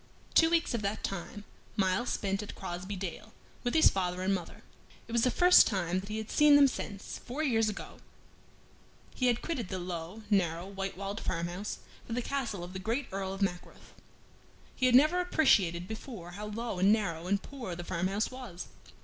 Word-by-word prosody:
Two 325 Hz, -, +6 dB
weeks 335 Hz, -5 st, +2 dB
of 235 Hz, -, -1 dB
that 205 Hz, +1 st, -2 dB
time 195 Hz, +2 st, -5 dB, 0.3 s
Myles 190 Hz, +4 st, +1 dB
spent 195 Hz, 0 st, -1 dB
at 210 Hz, -, -8 dB
Crosbey 185 Hz, +2 st, -5 dB
Dale 195 Hz, +3 st, -6 dB, 0.3 s
with 245 Hz, +2 st, -1 dB
his 320 Hz, -, +7 dB
father 180 Hz, -1 st, -1 dB
and 195 Hz, +1 st, +2 dB
mother. 180 Hz, -3 st, -5 dB, 0.4 s
It -, -, -10 dB
was 235 Hz, 0 st, +2 dB
the 250 Hz, -, +4 dB
first 360 Hz, +6 st, +7 dB
time 185 Hz, -3 st, 0 dB
that 195 Hz, +2 st, -9 dB
he 215 Hz, -, -3 dB
had 220 Hz, -1 st, -5 dB
seen 300 Hz, -1 st, +6 dB
them 285 Hz, -1 st, +8 dB
since, 200 Hz, -6 st, -5 dB
four 270 Hz, +6 st, -3 dB
years 225 Hz, -6 st, +2 dB
ago, 210 Hz, -, -7 dB, 1.1 s
he 255 Hz, -, +1 dB
had 240 Hz, -1 st, +1 dB
quitted 245 Hz, -, -3 dB
the 190 Hz, -, -3 dB
low, 175 Hz, +3 st, -6 dB
narrow, 175 Hz, -3 st, +2 dB
white 195 Hz, -1 st, -5 dB
walled 200 Hz, +2 st, -4 dB
farmhouse 175 Hz, +4 st, -3 dB, 0.3 s
for 230 Hz, -, -4 dB
the 245 Hz, +1 st, -1 dB
castle 235 Hz, -10 st, -3 dB
of 175 Hz, +1 st, -8 dB
the 190 Hz, -, -5 dB
great 230 Hz, +7 st, -2 dB
Earl 190 Hz, 0 st, -3 dB
of 195 Hz, +1 st, -2 dB
Mackworth. 180 Hz, -2 st, -5 dB, 0.8 s
He 255 Hz, -, +2 dB
had 250 Hz, -, +5 dB
never 310 Hz, +7 st, +6 dB
appreciated 190 Hz, -, +3 dB
before 220 Hz, -5 st, -7 dB
how 210 Hz, +3 st, -6 dB
low 220 Hz, -2 st, -4 dB
and 195 Hz, +3 st, +5 dB
narrow 175 Hz, -6 st, 0 dB
and 200 Hz, +1 st, +2 dB
poor 240 Hz, -8 st, -7 dB
the 175 Hz, -, -6 dB
farm 185 Hz, +1 st, -1 dB
house 200 Hz, +5 st, -1 dB
was. 245 Hz, -9 st, -8 dB
200 Hz, 195 wpm, -31 LUFS, 185-240 Hz, 1.1 s, them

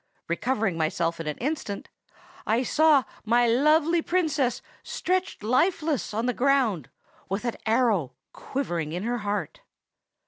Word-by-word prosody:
Recovering 210 Hz, 0 st, 0 dB
myself 165 Hz, +1 st, 0 dB
in 165 Hz, -, -5 dB
an 150 Hz, -, -3 dB
instant, 260 Hz, -6 st, -3 dB, 0.6 s
I 230 Hz, +4 st, +2 dB
saw 300 Hz, +1 st, +4 dB, 0.2 s
my 240 Hz, +2 st, +3 dB
lovely 305 Hz, +7 st, +3 dB
Princess 305 Hz, -8 st, 0 dB, 0.2 s
stretched 370 Hz, -, -2 dB
lifeless 305 Hz, -, +1 dB
on 220 Hz, +3 st, -1 dB
the 250 Hz, -, +1 dB
ground, 245 Hz, -, +1 dB, 0.4 s
with 195 Hz, +5 st, -2 dB
an 235 Hz, -, -2 dB
arrow 220 Hz, -, +2 dB, 0.2 s
quivering 175 Hz, -, -3 dB
in 180 Hz, +3 st, -3 dB
her 240 Hz, +2 st, -1 dB
heart! 205 Hz, -5 st, -3 dB
240 Hz, 130 wpm, -26 LUFS, 200-285 Hz, 0.6 s, saw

